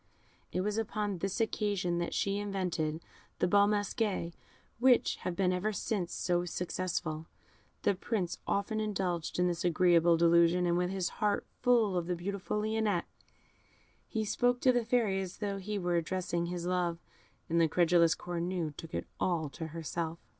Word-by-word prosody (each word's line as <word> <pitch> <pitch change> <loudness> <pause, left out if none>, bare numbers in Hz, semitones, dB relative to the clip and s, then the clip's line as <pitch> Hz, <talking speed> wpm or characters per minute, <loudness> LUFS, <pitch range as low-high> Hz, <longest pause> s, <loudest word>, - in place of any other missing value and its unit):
It 185 - 0
was 210 +3 -1
upon 210 -3 -2
this 195 +4 -2
occasion 200 -6 0
that 170 - -2
she 200 0 0
invented 180 -6 -2 0.4
the - - +2
Bal 200 +2 +5
Masqués, 205 -4 -1 0.5
which 250 0 +4
have 180 - -4
been 185 -1 +2
ever 190 +4 0
since 195 -2 -2
so 175 0 0
successful. 175 -2 -3 0.6
The - - +4
Prince 190 -2 -2
often 210 +2 0
indulged 185 -6 -2
in 180 - +3
this 175 -1 -1
agreeable 170 -1 +4
delusion, 170 +1 +4
and 170 0 +2
with 180 0 +1
his 190 -2 -1
heart 210 -1 +1 0.2
full 235 -6 +3
of 175 -1 -2
the 180 - 0
beautiful 200 +3 -3
Lionette, 215 -4 0 1.0
he 220 -2 -2
spoke 245 +3 +1
to 255 - +5
the 245 -1 +1
Fairy 220 -5 +1
as 185 -1 -6
though 200 -2 -3
he 205 +2 -3
were 175 -2 0
addressing 170 0 -1
his 175 0 -4
love, 175 -2 0 0.5
and 170 +1 +2
the 165 - +5
credulous 170 0 +4
Cornue 175 -3 -3
took 165 +1 -8
it - - -2
all 165 -5 0
to 160 +4 -6
herself. 165 +1 -4
180 Hz, 165 wpm, -32 LUFS, 170-205 Hz, 1.0 s, Bal